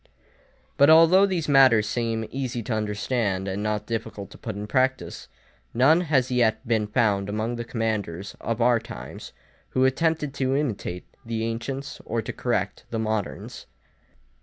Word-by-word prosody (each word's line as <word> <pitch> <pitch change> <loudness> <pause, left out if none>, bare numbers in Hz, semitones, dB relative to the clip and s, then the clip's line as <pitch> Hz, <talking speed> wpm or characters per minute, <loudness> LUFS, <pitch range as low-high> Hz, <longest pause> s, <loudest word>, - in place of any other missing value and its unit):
But 140 +1 +6
although 165 +5 +7
these 180 -5 -2
matters 130 -7 +5
seem 115 0 -1
easy 130 -3 -3
to 120 - -3
understand 105 -2 -1
and 95 +1 -3
not 105 0 -2
difficult 105 -3 -5
to - - -12
put 110 -3 -5
in 105 +1 -5
practice, 130 +5 -1 0.5
none 145 +8 +5
has 135 -7 +1
yet 120 -1 +1
been 110 -2 +1
found 105 -3 +1
among 110 +3 -2
the 120 - -4
commanders 105 -6 -3
of 115 0 -2
our 120 -1 +4
times, - - -9 0.4
who 130 0 +2
attempted 150 +1 +1
to 135 -1 0
imitate 110 -10 -3 0.2
the 115 -2 -3
ancients 120 +5 -4
or 115 0 -2
to - - -5
correct - - -2
the 115 - -3
moderns. 110 -2 -3
115 Hz, 155 wpm, -25 LUFS, 105-130 Hz, 0.5 s, although